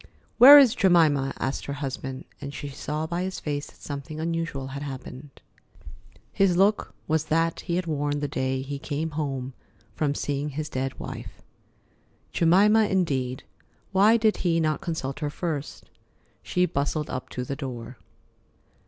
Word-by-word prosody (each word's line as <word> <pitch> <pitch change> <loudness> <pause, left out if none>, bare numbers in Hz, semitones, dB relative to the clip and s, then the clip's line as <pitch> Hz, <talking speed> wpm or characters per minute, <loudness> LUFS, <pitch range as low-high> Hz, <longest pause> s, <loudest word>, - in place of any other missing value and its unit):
"Where 275 +5 +12
is 265 -5 +7
Jemima?" 160 - +3
asked 135 +2 -3
her 140 - -3
husband, 135 -2 -5 0.2
and 140 0 -6
she 145 - -5
saw 150 +3 -4
by 170 +2 -3
his 185 0 -3
face 145 -1 -3
that - - -17
something 145 +2 -6
unusual 165 -5 -3
had 140 +1 -6
happened. 135 0 -8 0.9
His 190 -3 +3
look 200 +3 +2
was 155 0 +1
that 165 +1 +1
he 170 - -3
had 180 0 -1
worn 145 -2 -1
the 145 - -2
day 130 -1 -2
he 140 +1 -5
came 155 +2 -3
home 135 -4 -3 0.4
from 145 +4 -1
seeing 145 +1 -2
his 150 +2 -5
dead 130 0 -3
wife. - - -8 0.9
Jemima 205 +6 +5
indeed! 135 -10 -1 0.5
Why 205 +4 +5
did 220 -1 +2
he 165 -2 +1
not 155 -2 0
consult 160 -6 -4
her 150 -1 -2
first? 150 -2 -5 0.5
She 180 0 +1
bustled 150 -1 -2
up 130 - -5
to 125 - -4
the 140 +2 -4
door. 125 -3 -7
150 Hz, 155 wpm, -26 LUFS, 135-170 Hz, 0.9 s, Where